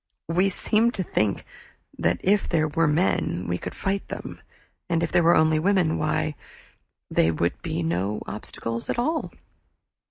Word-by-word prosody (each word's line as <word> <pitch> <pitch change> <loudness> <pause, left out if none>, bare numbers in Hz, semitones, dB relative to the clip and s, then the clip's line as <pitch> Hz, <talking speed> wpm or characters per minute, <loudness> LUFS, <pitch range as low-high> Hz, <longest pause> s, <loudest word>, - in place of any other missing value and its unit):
We 180 +4 +3
seemed 220 +5 +2
to 190 - -1
think 105 - -1 0.5
that - - 0
if 200 +2 +2
there 155 -2 +2
were 165 +2 +1
men 150 - +1
we 90 0 -1
could - - -6
fight 195 0 -2
them, - - -7 0.5
and 170 -1 +1
if 165 - -1
there - - +4
were 170 +1 +5
only 155 0 +4
women 180 -2 +2
why, 155 0 0 0.8
they 80 - +3
would 85 +2 -1
be 85 - -3
no 90 +6 -1
obstacles 115 +2 -4
at - - -1
all. 310 +6 -1
160 Hz, 160 wpm, -25 LUFS, -, 0.8 s, were